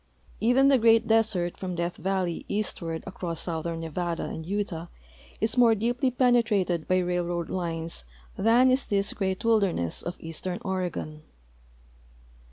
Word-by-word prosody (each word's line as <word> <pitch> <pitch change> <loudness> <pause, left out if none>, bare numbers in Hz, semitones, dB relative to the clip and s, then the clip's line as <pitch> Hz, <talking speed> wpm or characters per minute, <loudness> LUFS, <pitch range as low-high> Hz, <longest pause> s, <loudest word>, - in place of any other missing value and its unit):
Even 250 +5 +4
the 270 -2 +5
great 225 0 +5
desert 215 -6 +2
from 185 -2 -4
Death 175 +1 -2
valley 185 -3 -1
eastward 170 -6 -2
across 175 -4 -4
southern 165 -1 -3
Nevada 165 +1 -3
and 160 - -5
Utah 195 -4 -3 0.5
is 220 +3 +1
more 230 -2 +6
deeply 240 +5 0
penetrated 230 -9 +2
by 185 - +3
railroad 175 -1 -1
lines 165 - -3 0.3
than 240 +4 +4
is 260 +2 +1
this 200 -1 0
great 190 +1 -2
wilderness 200 - +1
of 175 - -5
eastern 170 +3 -3
Oregon. 180 -5 -3
185 Hz, 135 wpm, -27 LUFS, 170-225 Hz, 0.5 s, more